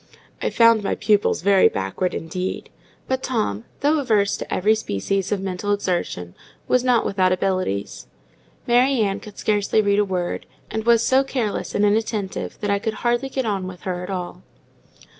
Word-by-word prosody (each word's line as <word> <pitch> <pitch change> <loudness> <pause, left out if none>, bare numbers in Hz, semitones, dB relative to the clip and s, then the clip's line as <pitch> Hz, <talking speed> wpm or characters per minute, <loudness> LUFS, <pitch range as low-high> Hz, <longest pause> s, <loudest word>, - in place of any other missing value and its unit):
I - - 0
found 230 -2 +5
my 195 - -1
pupils 205 -4 +1
very 195 -1 +5
backward, 100 - -2
indeed; 180 +3 -4 0.4
but 260 0 -1
Tom, 165 - -2 0.2
though 295 +2 +3
averse 215 -7 +2
to - - -7
every 210 +4 +3
species 195 - -2
of 205 - +1
mental 190 +1 -3
exertion, 175 - -2 0.3
was 250 -1 +3
not 250 -3 +3
without 185 -2 +2
abilities. 185 - -1 0.6
Mary 250 +1 +3
Ann 200 -1 0
could 210 -1 -12
scarcely 210 0 +1
read 205 -1 +3
a - - +4
word, 180 -3 -3 0.2
and 220 0 -3
was 230 -1 +5
so 265 +1 +4
careless 250 -6 -3
and 205 - +3
inattentive 210 -2 -1
that 205 -1 0
I 200 - +2
could 215 +1 -3
hardly 240 +3 +1
get 265 -1 -2
on 195 -4 -1
with 180 -1 -9
her 180 -1 -3
at 180 - -7
all. 180 -2 -5
205 Hz, 175 wpm, -22 LUFS, 185-230 Hz, 0.6 s, found